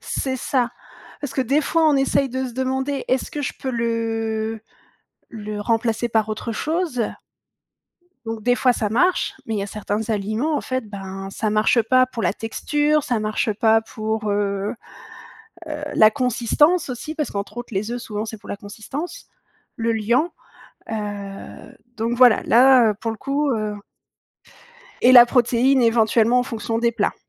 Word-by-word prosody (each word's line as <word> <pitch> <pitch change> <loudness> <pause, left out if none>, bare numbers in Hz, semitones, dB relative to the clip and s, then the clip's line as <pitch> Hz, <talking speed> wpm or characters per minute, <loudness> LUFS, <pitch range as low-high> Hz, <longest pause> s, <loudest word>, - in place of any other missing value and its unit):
c'est 260 -1 -3
ça. 250 -1 0 0.5
Parce 285 -3 -5
que 265 - 0
des 275 +5 +2
fois 320 +2 +2
on 290 - +3
essaye 270 0 +2
de 260 +1 -3
se 245 - -8
demander: 265 +2 -2
«Est-ce 255 0 0
que 295 - -4
je - - -2
peux 260 - -3
le 225 -1 -2 0.7
le 210 -2 -6
remplacer 230 +1 0
par 220 -1 +1
autre 220 +2 -4
chose»? 315 -2 -1 1.2
Donc 225 -1 -5
des 245 +2 +3
fois 250 0 +3
ça 215 -3 -1
marche, 320 - +1
mais 225 - -2
il - - -1
y - - -1
a - - -3
certains 210 0 -3
aliments 220 +9 -1
en - - -3
fait, 255 -4 -3
ben, 195 -1 -7
ça 215 +2 -2
marche 215 +2 +3
pas 255 +3 +4
pour 235 -3 -6
la - - +2
texture, 295 +6 0
ça 240 -4 -1
marche 215 0 -1
pas 220 +1 +3
pour, 220 -1 -3
heu 200 +1 -1 0.9
heu, 300 -1 -5
la 215 0 +7
consistance 280 +6 +2
aussi. 260 +6 -5
Parce 300 - -2
qu'entre 200 +3 -5
autres 240 -2 -7
les 205 +3 -2
œufs 245 - -3
souvent 210 0 -4
c'est 220 0 -7
pour - - -15
la - - -3
consistance, 265 - -7 0.5
le 230 0 0
liant, 235 +10 +1 0.6
heu, 205 -2 -7 0.2
donc 230 +2 -1
voilà 245 -3 +6
là, 250 -2 +6
heu, - - -2
pour 225 +2 -4
le 220 - -5
coup, 280 +4 -1
heu 215 -2 -2 1.3
et 255 - +6
la 240 -1 +10
protéine 245 +1 +3
éventuellement 230 +1 +3
en - - +3
fonction 225 -2 -3
des 235 0 +1
plats. 220 -3 0
230 Hz, 175 wpm, -22 LUFS, 215-260 Hz, 1.3 s, la